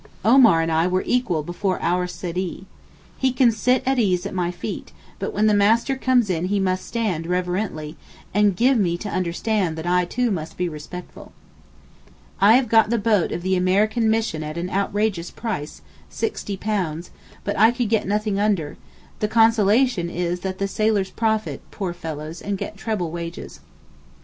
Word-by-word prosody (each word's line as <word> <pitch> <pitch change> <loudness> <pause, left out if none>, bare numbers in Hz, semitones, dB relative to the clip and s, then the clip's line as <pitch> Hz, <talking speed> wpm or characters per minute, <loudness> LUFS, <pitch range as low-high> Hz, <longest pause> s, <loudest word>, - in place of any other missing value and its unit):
Omar 230 -8 +6
and 165 0 -1
I 160 +2 +2
were 185 +1 0
equal 215 -11 0
before 180 +3 -2
our 180 +1 0
Seedee. 180 +1 -5 0.5
He 265 -1 +2
can 250 -1 +4
sit 250 +4 +1
at 265 0 +1
his - - +4
ease 180 -1 0
at - - -4
my 180 -2 0
feet, 175 - -6 0.3
but - - -3
when 215 - +1
the 215 - +4
Master 225 +6 +3
comes 255 -3 +2
in 175 -2 -1
he 200 +2 0
must 185 -1 -1
stand 200 -9 -2
reverently, 180 -3 -2 0.4
and 205 -1 +3
gave 250 +4 +3
me 175 -4 +1
to 205 - -6
understand 185 -1 -1
that 160 - -5
I 180 0 +2
too 245 +6 -1
must 160 -4 -4
be 180 - 0
respectful. 165 +3 -9 1.1
I 205 +3 +6
have 255 -1 +3
got 225 -1 +4
the 235 - +1
boat 210 -4 +2
of 175 - -4
the 190 0 +1
American 210 +5 +2
Mission 220 -8 0
at 155 +1 -5
an 175 +2 -3
outrageous 200 -2 -1
price, 195 -11 -5 0.3
£60, 195 - -3 0.3
but 205 - -2
I 220 - +7
could 240 -2 -1
get 220 -3 +1
nothing 210 0 0
under; 195 -8 0 0.4
the 210 - +1
consolation 225 -2 +3
is 175 0 -2
that 185 +1 -4
the 195 - -1
sailors 205 -2 0
profit, 220 -1 -1
poor 190 -4 -4
fellows, 160 -1 -7
and 200 -1 -3
get 210 - -6
treble 195 -5 -3
wages. 170 0 -7
195 Hz, 175 wpm, -22 LUFS, 175-220 Hz, 1.1 s, I